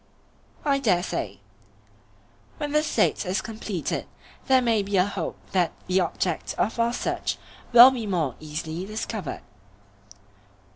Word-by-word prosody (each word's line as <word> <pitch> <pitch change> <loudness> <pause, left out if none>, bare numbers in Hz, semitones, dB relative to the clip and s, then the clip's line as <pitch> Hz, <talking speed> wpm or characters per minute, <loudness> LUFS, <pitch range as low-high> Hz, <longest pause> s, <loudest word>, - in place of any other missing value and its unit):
I 280 -1 +3
dare 185 -9 +2
say. - - -4 1.2
When 295 -2 -3
the 300 +1 +3
State 240 -8 +1
is 185 0 -1
completed 215 -7 -4 0.4
there 265 -2 +6
may 230 -4 +2
be 200 0 -1
a 180 - +5
hope 205 - -4
that 180 -4 +1
the 185 +1 +2
object 175 -1 -1
of 225 +3 0
our 230 0 +3
search - - -2 0.3
will 245 +2 +10
be 235 -5 -4
more 165 -9 0
easily 155 +3 -5
discovered. 215 -5 -4
205 Hz, 135 wpm, -25 LUFS, 180-235 Hz, 1.2 s, will